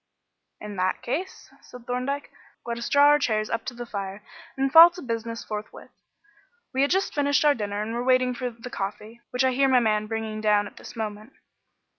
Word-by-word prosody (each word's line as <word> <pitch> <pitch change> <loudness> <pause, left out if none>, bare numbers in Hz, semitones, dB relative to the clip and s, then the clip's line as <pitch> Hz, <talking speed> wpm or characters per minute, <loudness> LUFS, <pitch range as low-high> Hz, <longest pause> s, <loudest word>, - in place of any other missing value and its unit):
"In 210 -2 -8
that 185 0 -1
case," 345 +10 -5
said 250 -1 -13
Thorndyke, 255 +4 -3 0.3
"let 235 0 -4
us 235 - -4
draw 285 0 +5
our 295 0 +5
chairs 215 -5 -1
up 230 - -2
to 250 - -5
the 240 0 -6
fire 200 -2 -6 0.3
and 270 0 0
fall 330 +1 +11
to 350 +1 -11
business 230 -1 -4
forthwith. 210 0 -7 0.8
We 260 - +1
had 280 - +3
just 385 +2 0
finished 285 0 +2
our 295 - +6
dinner 205 -3 -3
and 225 +2 -5
were 240 +1 -2
waiting 255 0 +3
for 250 0 -3
the 240 +1 -11
coffee, 210 +4 -6
which 250 0 0
I 260 - +3
hear 270 +2 +2
my 255 -1 +5
man 215 -2 +1
bringing 220 -1 -4
down 210 -1 +3
at - - -12
this - - -11
moment." 215 +2 -6
235 Hz, 205 wpm, -25 LUFS, 215-265 Hz, 0.8 s, fall